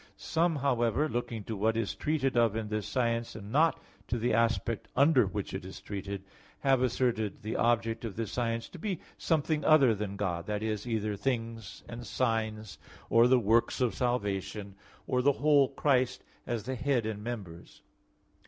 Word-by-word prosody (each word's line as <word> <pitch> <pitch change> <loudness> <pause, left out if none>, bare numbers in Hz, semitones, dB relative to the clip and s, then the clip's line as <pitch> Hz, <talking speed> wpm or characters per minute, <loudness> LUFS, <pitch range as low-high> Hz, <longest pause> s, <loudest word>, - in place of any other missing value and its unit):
Some, 165 +1 +1
however, 135 0 +1
looking 120 -5 -3
to 110 - -4
what 110 +3 +1
is 115 -3 -1
treated 145 -4 0
of 115 -3 +3
in 110 -1 -3
this 105 -1 -2
science, 115 -2 -1
and 105 -1 -8
not 160 +5 +3 0.3
to 120 - -1
the 120 +2 0
aspect 115 -1 +1
under 135 -5 +5
which 100 +1 -4
it 95 - -4
is 95 0 -9
treated, 100 0 -5 0.4
have 135 -2 +3
asserted 120 -5 0
the 110 - -3
object 115 -1 +1
of 110 -4 -5
this 110 -2 -3
science 115 -1 -1
to 180 - -11
be 190 -1 -2 0.2
something 155 -1 +1
other 140 -7 +6
than 100 -1 -4
God 90 -4 -2
that 105 0 -2
is, 110 0 -2
either 110 -2 -1
things 115 -1 -3
and 120 -1 -8
signs; 110 -3 -1 0.3
or 115 +1 +6
the 130 +1 +5
works 115 0 +2
of 125 -3 +1
salvation; 105 -4 -2 0.3
or 125 - +1
the 140 +2 +4
whole 145 -1 +4
Christ, 130 -4 +1 0.2
as 120 -4 -2
the 130 - -3
head 125 -2 0
and 105 -1 -4
members. 100 -8 -7
115 Hz, 175 wpm, -30 LUFS, 105-130 Hz, 0.4 s, other